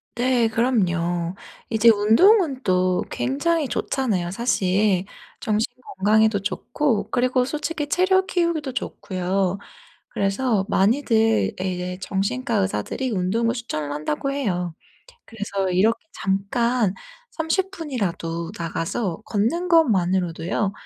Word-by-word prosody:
네 245 -1 +2
그럼요. 175 -7 0 0.3
이제 225 +1 +4
운동은 265 - +5
또 185 -1 +2
굉장히 295 +4 0
좋잖아요 210 -10 -1
사실. 195 -3 +1 0.3
정신 220 0 0 0.2
건강에도 215 +2 +3
좋고 220 +1 -1
그리고 250 0 +1
솔직히 300 +1 -3
체력 375 +3 +3
키우기도 335 -7 -1
좋고요. 190 -5 -2 0.5
그래서 200 +1 0
많이들 225 +1 +2
예 185 0 -1
이제 180 +1 -5
정신과 230 +7 -2
의사들이 195 - -1
운동을 220 +4 0
추천을 155 - -4
한다고 150 - -2
해요. 180 - -2 0.5
그래서 200 -4 -3
이렇게 225 - +2
잠깐 200 +2 0 0.4
30 350 +4 -1
분이라도 180 - -3
나가서 165 +3 -3
걷는 235 - 0
것만으로도요 190 - +2
215 Hz, 265 characters per minute, -23 LUFS, 185-255 Hz, 0.5 s, 운동은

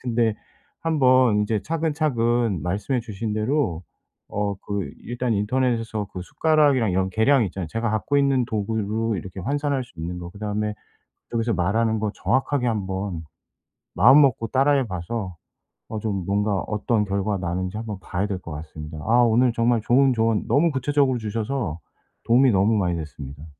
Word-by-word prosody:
근데 115 -3 +1 0.5
한번 130 -8 +4
이제 105 0 0
차근차근 125 - 0
말씀해 105 +8 -1
주신 110 -1 -5
대로 110 - 0 0.5
어 100 -1 -2
그 100 -2 -3
일단 120 0 -2
인터넷에서 115 -1 0
그 90 - -6
숟가락이랑 140 - +2
이런 95 +1 +1
계량 115 +6 +3
있잖아요, 95 -3 -5
제가 115 +2 -2
갖고 110 +6 0
있는 135 -2 +2
도구로 110 0 -1
이렇게 95 0 -7
환산할 140 - -1
수 - - -21
있는 90 +2 -4
거. 85 0 -7
그다음에 105 +2 -3 0.6
여기서 115 0 0
말하는 110 +6 +1
거 105 -1 -1
정확하게 130 0 0
1 110 -5 -1
번 95 -3 -4 0.7
마음먹고 130 -2 +5
따라 135 +4 +2
해 135 -2 +2
봐서 95 +1 -4 0.5
어 110 - -4
좀 100 -4 -2
뭔가 105 +1 +1
어떤 105 0 0
결과 100 +1 -1
나는지 90 +2 -3
1 115 - -5
번 105 -3 -5
봐야 95 +2 -2
될 100 -3 -3
것 85 -2 -9
같습니다. 75 0 -8
아 120 +2 +5
오늘 120 +1 +4
정말 115 0 +2
좋은 130 +2 +4
조언 115 -2 +1
너무 160 +4 +3
구체적으로 135 -1 +1
주셔서 110 - -3 0.5
도움이 125 +3 +5
너무 100 +3 +3
많이 90 -4 0
됐습니다. 75 -2 -8
110 Hz, 340 characters per minute, -23 LUFS, 100-125 Hz, 0.7 s, 마음먹고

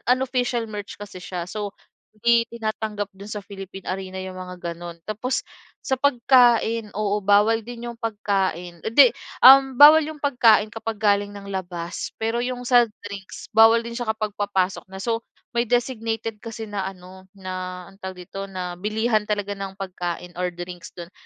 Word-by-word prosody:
unofficial 250 -2 -1
merch 205 -2 -7
kasi 205 -3 -9
siya. 180 -3 -4
So, 205 0 -5 0.4
hindi 230 +2 +3
tinatanggap 215 -3 -3
do'n 195 +1 -12
sa 210 -1 -5
Philippine 195 -1 -9
Arena 190 0 -4
yung 185 0 -7
mga 180 -2 -6
gano'n. 170 0 -9
Tapos, 220 +5 -2 0.4
sa 265 -2 -1
pagkain, 240 -4 +4
oo, 210 -1 0
bawal 205 +3 +4
din 240 +1 -7
yung 235 - -14
pagkain 195 -6 -2
'di, 250 +2 +7 0.3
um, 270 0 +9
bawal 300 +4 +10
yung 310 0 -5
pagkain 225 -6 +4
kapag 225 0 -4
galing 205 -1 +2
ng 200 -1 -10
labas 175 -3 -5
pero 225 +2 0
yung 245 0 -4
sa 245 -1 +6 0.2
drinks 200 -1 -9
bawal 225 +1 +7
din 235 - -6
siya 240 -2 -4
kapag 215 -1 -1
papasok 195 -2 0
na. 190 0 -10
So, 230 -1 0 0.3
may 235 0 0
designated 225 -2 -1
kasi 225 0 -7
na 195 -2 -2
ano 185 0 -11
na 185 -1 -6
anong 195 - -21
tawag 190 -1 -6
dito? 195 +2 -7
Na 180 -2 -5
bilihan 215 +1 0
talaga 205 -1 -1
ng 195 -1 -6
pagkain 180 -2 -5
or 180 -1 -2
drinks 175 0 -7
do'n, 175 0 -9
210 Hz, 165 wpm, -23 LUFS, 190-230 Hz, 0.4 s, bawal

